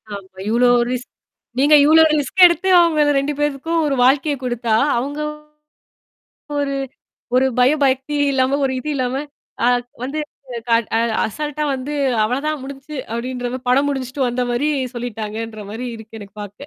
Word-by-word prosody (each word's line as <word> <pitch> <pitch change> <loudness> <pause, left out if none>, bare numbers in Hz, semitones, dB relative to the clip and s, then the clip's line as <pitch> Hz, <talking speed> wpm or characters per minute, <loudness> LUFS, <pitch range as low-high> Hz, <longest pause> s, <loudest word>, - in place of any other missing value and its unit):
ஆமா. 190 -1 -12
இவ்ளோ 240 +2 +3 0.2
ரிஸ்க் 250 0 -4 0.5
நீங்க 290 +2 +6
இவ்ளோ 320 +2 +7
ரிஸ்க் 300 +6 +2
எடுத்து 350 +2 +3
அவங்க 315 -3 +3
2 285 +2 -2
பேருக்கும் 295 +3 0
ஒரு 285 -2 0
வாழ்க்கையை 285 +3 +3
குடுத்தா, 240 -2 0 0.2
அவங்க 280 +5 -3 1.4
ஒரு 275 -1 -1 0.6
ஒரு 260 +1 +4
பய 250 +1 +5
பக்தி 265 +2 0 0.2
இல்லாம 265 +1 +2
ஒரு 265 - 0
இது 305 - -7
இல்லாம 260 +2 -1 0.4
அ - - +4 0.4
வந்துஅ 295 +4 -3 1.0
அசல்ட்டா 300 +6 -4
வந்து 265 +3 -5 0.3
"அவ்வளதான் 280 +6 -1
முடிஞ்சுச்சு" 280 +2 -8 0.2
அப்படின்ற 245 +1 -3
படம் 275 +3 +3
முடிச்சுட்டு 265 -1 -4
வந்த 245 +1 -1
மாரி 260 +5 0 0.3
சொல்லிட்டாங்கன்ற 225 -2 -5
மாரி 235 +4 -5
இருக்கு 220 0 -11
எனக்கு 200 +1 -13
பாக்க. 205 0 -10
265 Hz, 135 wpm, -19 LUFS, 240-295 Hz, 1.4 s, இவ்ளோ